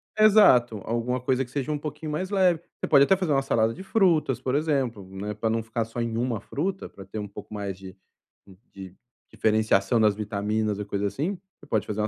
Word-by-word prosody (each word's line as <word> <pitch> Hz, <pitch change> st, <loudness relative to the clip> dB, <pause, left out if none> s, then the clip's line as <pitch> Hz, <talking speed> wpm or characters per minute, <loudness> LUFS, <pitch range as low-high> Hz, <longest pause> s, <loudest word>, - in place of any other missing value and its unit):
tal. 215 Hz, 0 st, +5 dB
Exato, 125 Hz, -, +6 dB
alguma 120 Hz, +2 st, -1 dB
coisa 130 Hz, +1 st, 0 dB
que 125 Hz, -, -13 dB
seja 140 Hz, 0 st, -3 dB
um 150 Hz, -, -1 dB
pouquinho 150 Hz, +1 st, -6 dB
mais 185 Hz, +5 st, -2 dB
leve. 185 Hz, -5 st, +2 dB, 0.2 s
Você -, -, -3 dB
pode 140 Hz, -2 st, +6 dB
até 190 Hz, +7 st, +4 dB
fazer 180 Hz, -5 st, 0 dB
uma 135 Hz, -, +3 dB
salada 115 Hz, -4 st, +1 dB
de 190 Hz, -, -9 dB
frutas, 170 Hz, -, +2 dB
por 130 Hz, +1 st, -2 dB
exemplo, 135 Hz, -9 st, -1 dB
né, 100 Hz, +2 st, -5 dB
pra 110 Hz, +2 st, -2 dB
não 115 Hz, 0 st, 0 dB
ficar 115 Hz, +1 st, -2 dB
só 115 Hz, +1 st, -7 dB
em 115 Hz, -1 st, -2 dB
uma 120 Hz, -2 st, -1 dB
fruta, 185 Hz, -, -3 dB
pra 95 Hz, -, -12 dB
ter 95 Hz, +3 st, -7 dB
um 105 Hz, -, -5 dB
pouco 100 Hz, -, -11 dB
mais 100 Hz, -2 st, -4 dB
de 95 Hz, -1 st, -11 dB, 0.8 s
de 95 Hz, -1 st, -10 dB, 0.4 s
diferenciação 110 Hz, 0 st, +2 dB
das 105 Hz, -2 st, +4 dB
vitaminas 105 Hz, 0 st, -2 dB
ou 105 Hz, -, -4 dB
coisa 100 Hz, 0 st, -2 dB
assim. 165 Hz, -, -3 dB, 0.2 s
Você -, -, -16 dB
pode 110 Hz, -6 st, -1 dB
fazer 105 Hz, 0 st, -4 dB
uma 105 Hz, -, 0 dB
115 Hz, 225 wpm, -26 LUFS, 105-150 Hz, 0.8 s, Exato